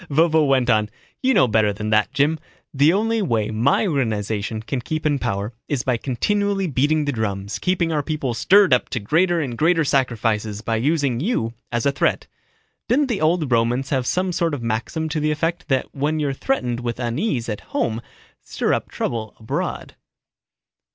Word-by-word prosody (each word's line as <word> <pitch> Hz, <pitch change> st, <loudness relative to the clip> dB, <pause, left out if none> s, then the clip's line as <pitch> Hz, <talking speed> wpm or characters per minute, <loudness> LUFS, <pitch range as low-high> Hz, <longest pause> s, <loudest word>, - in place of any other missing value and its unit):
Vovo 160 Hz, +1 st, +3 dB
went 130 Hz, -2 st, +2 dB
on. 110 Hz, -3 st, +2 dB, 0.3 s
"You 265 Hz, 0 st, +2 dB
know 130 Hz, -, +5 dB
better 110 Hz, -2 st, +2 dB
than 105 Hz, +1 st, -4 dB
that, 105 Hz, +1 st, +3 dB
Jim. 145 Hz, +3 st, +1 dB, 0.3 s
The 145 Hz, +3 st, +4 dB
only 225 Hz, +4 st, +1 dB
way 115 Hz, -, 0 dB
my 120 Hz, -, +2 dB
organization 110 Hz, -, -1 dB
can 125 Hz, +2 st, -3 dB
keep 155 Hz, +5 st, -4 dB
in 145 Hz, -2 st, +2 dB
power 105 Hz, -2 st, -2 dB
is 140 Hz, -4 st, -1 dB
by 125 Hz, -2 st, +1 dB
continually 200 Hz, -, 0 dB
beating 150 Hz, +1 st, +1 dB
the 145 Hz, -, 0 dB
drums, 100 Hz, -3 st, -3 dB
keeping 180 Hz, -2 st, 0 dB
our 150 Hz, -2 st, +1 dB
people 145 Hz, -4 st, -2 dB
stirred 190 Hz, -, +5 dB
up 125 Hz, -, +2 dB
to -, -, -2 dB
greater 170 Hz, -, +2 dB
and 130 Hz, -6 st, -3 dB
greater 165 Hz, +4 st, +2 dB
sacrifices 110 Hz, -6 st, 0 dB
by 115 Hz, 0 st, -1 dB
using 140 Hz, -1 st, +1 dB
you 135 Hz, -, -1 dB, 0.2 s
as 120 Hz, -1 st, -1 dB
a 140 Hz, -, +4 dB
threat. 140 Hz, -, 0 dB, 0.6 s
Didn't 270 Hz, +3 st, +2 dB
the 230 Hz, -, -1 dB
old 155 Hz, -3 st, +1 dB
Romans 120 Hz, +4 st, +1 dB
have 130 Hz, -3 st, 0 dB
some 185 Hz, 0 st, 0 dB
sort 165 Hz, -3 st, 0 dB
of 125 Hz, -, -7 dB
maxim 115 Hz, +8 st, -2 dB
to 155 Hz, 0 st, -1 dB
the 150 Hz, +1 st, 0 dB
effect 165 Hz, +2 st, -2 dB
that 135 Hz, -3 st, -1 dB
when 150 Hz, +3 st, -1 dB
you're 145 Hz, -2 st, 0 dB
threatened 125 Hz, -, -1 dB
with 120 Hz, -1 st, -4 dB
unease 120 Hz, -, -1 dB
at 105 Hz, -3 st, -4 dB
home 115 Hz, 0 st, -1 dB, 0.4 s
stir -, -, -1 dB
up -, -, -2 dB
trouble 110 Hz, -3 st, -4 dB
abroad?" 110 Hz, -, -4 dB
135 Hz, 185 wpm, -22 LUFS, 115-160 Hz, 0.6 s, know